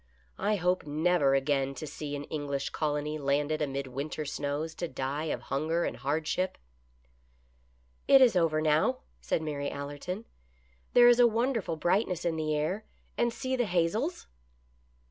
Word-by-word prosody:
I 210 - +1
hope 180 -3 0
never 150 -2 +2
again 135 0 +1
to 155 - -6
see 145 0 -5
an 145 - -5
English 145 -2 -3
colony 150 0 -2
landed 145 +2 0
amid 140 -1 -2
winter 140 +4 -4
snows 145 +2 -3
to 175 - -4
die 135 +2 -3
of 135 -6 -2
hunger 160 +5 +1
and - - -3
hardship." 160 +6 -1 0.8
" 60 0 -37
It 275 - +8
is 250 -6 +6
over 160 -3 +2
now," 155 +12 +2 0.2
said 160 - -1
Mary 145 -2 -2
Allerton. 145 +9 -5 0.3
" - - -36
There 240 0 +8
is 240 0 +6
a 245 - +8
wonderful 230 -6 0
brightness 175 +2 0
in 170 -1 +1
the 155 -1 -1
air, 180 +8 -1 0.3
and 240 0 +1
see 260 +2 -2
the 245 -2 +1
hazels 205 - 0
155 Hz, 160 wpm, -29 LUFS, 140-180 Hz, 0.8 s, It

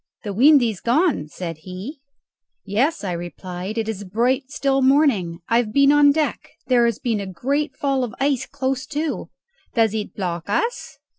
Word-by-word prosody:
"The 205 -3 -4
wind 275 +5 +6
is 220 -6 -2
gone," 255 - +1
said 165 +1 -6
he. 185 - -8 0.7
"Yes," 230 +11 0
I 190 - -2
replied, 180 +3 -6
"it 225 -1 -1
is 215 -3 -4
a - - -8
bright 250 +7 0
still 275 -1 0
morning. 260 - +2
I 230 - +3
have 235 -3 0
been 280 +3 +5
on 290 -1 +6
deck. 305 +1 -1 0.2
There 245 -2 +3
has 235 -3 0
been 230 -4 -1
a 200 - -5
great 270 - -2
fall 275 -2 0
of 240 - -5
ice 275 -2 0
close 265 -2 -2
to." 300 +2 -3 0.5
"Does 225 -3 +3
it 215 -1 -4
block 175 -2 -4
us?" 465 - -2
240 Hz, 180 wpm, -22 LUFS, 200-280 Hz, 0.7 s, wind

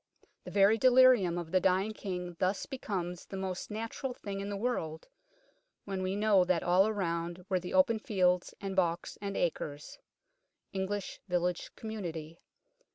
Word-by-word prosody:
" - - -34
The - - -6
very 205 +3 +4
delirium 250 -8 +6
of 170 -2 -5
the 185 - +4
dying 190 +4 +2
King 180 -4 -5
thus 185 +2 0
becomes 180 -9 -4
the 195 - -6
most 190 -1 -4
natural 230 +4 -4
thing 200 -1 -5
in 200 +1 -4
the 200 - -3
world 195 -9 -2 0.8
when 195 -2 -3
we 185 +1 -1
know 205 -2 +4
that 180 -2 +1
all 190 +4 +4
round 175 -3 -3
were 185 -2 +2
the 180 +6 -5
open 265 -6 +4
fields 180 -4 +1
and 195 -1 -4
balks 170 -2 0
and 200 -1 -3
acres 150 -3 -3 0.4
" - - -51
(English 195 +1 -3
Village 180 -1 0
Community). 170 -7 -6
190 Hz, 160 wpm, -31 LUFS, 175-210 Hz, 0.8 s, delirium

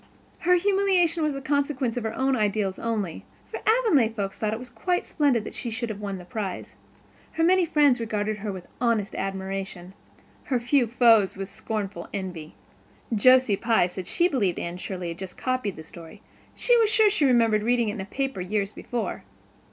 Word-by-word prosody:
Her 360 +1 +4
humiliation 370 -3 +2
was 305 -2 0
the 275 - -6
consequence 275 -4 0
of 245 - -3
her 220 - -3
own 265 0 +1
ideals 205 -3 0
only, 210 -7 -3 0.3
for - - -4
Avonlea 440 - +4
folks 200 -3 -4
thought 215 -1 -2
it 240 +3 -5
quite 355 +10 -1
splendid 275 -8 +1
that - - -8
she 240 - -5
should 230 +1 -4
have 210 -2 -5
won 200 -2 -4
the 180 - -10
prize. 195 0 -5 0.6
Her 325 - 0
many 360 0 +4
friends 290 -5 +4
regarded 215 -1 -2
her 210 0 -4
with 185 -2 -8 0.2
honest 230 -4 +1
admiration; 195 -1 -5 0.5
her 255 -3 0
few 245 +1 +2
foes 225 -4 +4
with 195 0 -5
scornful 205 0 -5
envy. 180 - -6 0.6
Josie 255 0 +5
Pye 225 -2 +2
said 180 0 -6
she 345 - +2
believed 215 - 0
Anne 170 +1 -4
Shirley 180 -1 -5
had 170 - -7
just 190 -1 -8
copied 255 -6 -2
the 160 - -9
story; 170 +5 -13 0.3
she 485 - +3
was 450 -2 +4
sure 435 -1 +4
she 400 -7 0
remembered 230 -4 +4
reading 235 0 +1
it - - -3
in 205 - -5
a - - -5
paper 270 0 -3
years 200 +2 -1
before. 240 +1 -4
225 Hz, 190 wpm, -25 LUFS, 195-270 Hz, 0.6 s, Josie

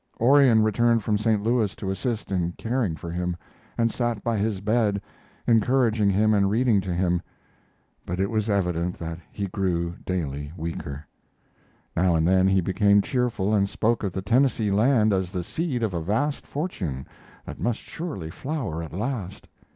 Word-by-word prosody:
Orion 125 -3 +6
returned 115 +1 +2
from 105 0 +1
St. 105 -1 +1
Louis 115 -3 +1
to 95 - -4
assist 110 +2 -3
in 90 -2 0
caring 115 -7 -1
for 85 +1 -7
him, 90 0 -2 0.4
and 115 -1 +2
sat 120 -3 -2
by 115 -1 0
his 105 -1 -1
bed, 105 0 +1 0.5
encouraging 115 -2 +3
him 105 +3 +3
and 100 -2 +3
reading 110 -1 +3
to 95 -1 -4
him, 90 0 +1 0.8
but 90 +1 -4
it 95 +2 0
was 110 -1 0
evident 90 -3 0
that 80 0 -5
he 100 - -3
grew 90 -3 -1
daily 75 -5 -3
weaker. 80 -3 -5 0.9
Now 85 0 +3
and 80 0 +2
then 95 +1 +4
he 95 0 +3
became 100 +3 +3
cheerful 120 -5 0
and 100 -2 +2
spoke 115 +3 0
of 100 - -1
the 95 +1 -4
Tennessee 115 -2 +2
land 110 0 +3
as 95 -2 0
the 90 -1 -3
seed 135 - -2
of 105 -4 -1
a 85 - -2
vast 135 - -1
fortune 90 - -4 0.4
that - - -8
must 120 -1 0
surely 140 - -6
flower 125 - -4
at 80 - -8
last. 105 -2 -4
100 Hz, 170 wpm, -25 LUFS, 90-115 Hz, 0.9 s, Orion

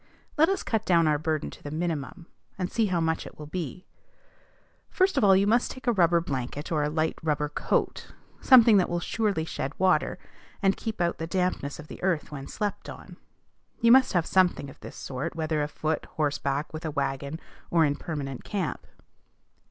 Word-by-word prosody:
Let 320 +3 +4
us 390 -2 -1
cut 220 -2 -1
down 170 -4 +3
our 150 -1 +2
burden 155 -1 -2
to - - -13
the 145 - -7
minimum, 160 0 -3 0.3
and 180 -2 -3
see 225 -2 +1
how 180 -3 0
much 160 0 -1
it - - -13
will 150 - -8
be. 175 +3 -5 1.0
First 375 -1 +2
of 270 - +2
all, 195 -2 +7
you 195 +1 +3
must 235 +4 +2
take 260 - -9
a 240 - +4
rubber 170 -4 +4
blanket 145 -2 -4
or 155 -2 +1
a 150 - 0
light 155 +1 -1
rubber 150 -2 0
coat, - - -1 0.3
something 235 -5 +7
that 185 - +2
will 175 - -1
surely 200 -3 -1
shed 135 -3 -5
water, 190 -1 +2 0.4
and 195 -1 +2
keep 220 -4 -4
out 170 0 0
the 165 - -3
dampness 180 -6 -1
of 160 - -10
the - - -10
earth 175 -5 0
when 140 -2 -7
slept 210 -2 -4
on. - - -11 0.6
You 230 - +5
must 260 +1 +6
have 175 -3 +2
something 180 -7 +2
of - - -18
this - - -10
sort, 140 +5 -5
whether 155 -1 -1
afoot, 155 +1 -2
horseback, 145 0 -1
with 155 +2 -6
a 160 - -2
wagon, 140 +1 -3 0.3
or 165 -2 +4
in 145 -1 +1
permanent 140 -4 -5
camp. 195 -7 -3
165 Hz, 195 wpm, -27 LUFS, 150-190 Hz, 1.0 s, all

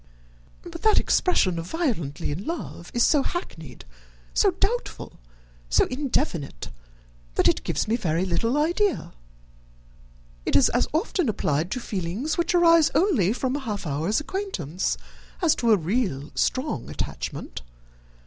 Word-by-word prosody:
"But 335 -1 -9
that 435 -1 +5
expression 185 - +2
of 165 - -6
'violently 215 - -2
in 165 +7 -4
love' 320 - -5
is 240 - +2
so 295 - +4
hackneyed, 160 - -6 0.5
so - - +4
doubtful, - - -2 0.5
so - - +4
indefinite, 250 - -2 0.7
that - - +3
it - - +2
gives - - -1
me 225 +2 +1
very 170 -4 0
little 230 +9 0
idea. 345 +6 +1 1.3
It - - -1
is 270 - +6
as 245 - +1
often 330 - 0
applied 155 -5 0
to 250 - -2
feelings 205 - -3
which 345 0 +1
arise 335 -2 +6
only 290 - +3
from 255 +2 -1
a - - -1
half 215 -8 -4
hour's 155 +8 0
acquaintance, 295 - -2 0.4
as 335 -4 +4
to 235 -2 +2
a 215 - +6
real, 175 - -1
strong 255 - -1
attachment. - - -5
235 Hz, 140 wpm, -25 LUFS, -, 1.3 s, is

